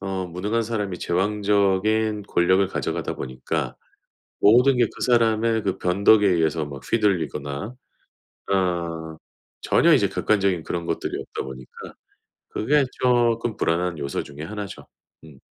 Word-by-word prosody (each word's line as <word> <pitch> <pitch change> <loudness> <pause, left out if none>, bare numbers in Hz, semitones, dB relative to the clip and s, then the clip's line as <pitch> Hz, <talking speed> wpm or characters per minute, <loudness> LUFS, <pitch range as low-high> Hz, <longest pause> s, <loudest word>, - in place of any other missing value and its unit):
어 95 -1 -3
무능한 100 +7 -2
사람이 105 -5 -3
제왕적인 105 +3 +1
권력을 95 +2 +3
가져가다 95 - -3
보니까 65 0 -4 0.6
모든 125 +5 +5
게 120 - +4
그 - - -12
사람의 115 -2 +2
그 95 -1 -1
변덕에 100 +4 +4
의해서 80 -3 +1
막 70 -2 -9
휘둘리거나 90 - -1 0.8
어 85 -4 -1 0.5
전혀 - - +4
이제 - - +3
객관적인 100 -5 +1
그런 85 +1 -4
것들이 - - -3
없다 - - -6
보니까 65 -1 -10 0.6
그게 145 +6 +2 0.2
쪼끔 120 -3 +2
불안한 85 +1 0
요소 70 -1 -3
중에 75 +1 -10
1 105 +4 -5
죠. 100 - -11 0.4
음. 75 -4 -14
95 Hz, 285 characters per minute, -23 LUFS, 85-110 Hz, 0.8 s, 모든